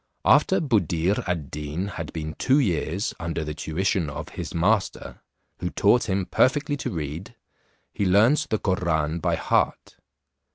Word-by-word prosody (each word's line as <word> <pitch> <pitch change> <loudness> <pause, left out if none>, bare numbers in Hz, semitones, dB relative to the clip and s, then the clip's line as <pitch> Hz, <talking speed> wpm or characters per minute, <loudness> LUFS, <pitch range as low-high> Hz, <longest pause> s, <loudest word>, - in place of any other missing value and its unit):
After 150 +6 +5
Buddir 95 - +1
ad 85 -6 -3
Deen 75 +5 -4
had 85 -5 -6
been 80 -1 -5
two 130 +2 +3
years 95 - 0
under 85 -1 -3
the 75 0 -4
tuition 80 +2 -1
of 75 - -6
his - - -6
master, 100 +4 0 0.4
who 90 - -2
taught 110 +5 +2
him 95 0 0
perfectly 145 - +2
to - - -3
read, 80 +7 -5 0.6
he 100 - 0
learnt 115 +11 +4
the 110 - +1
Koran 85 -5 0
by - - 0
heart. - - 0
90 Hz, 150 wpm, -25 LUFS, 80-105 Hz, 0.6 s, After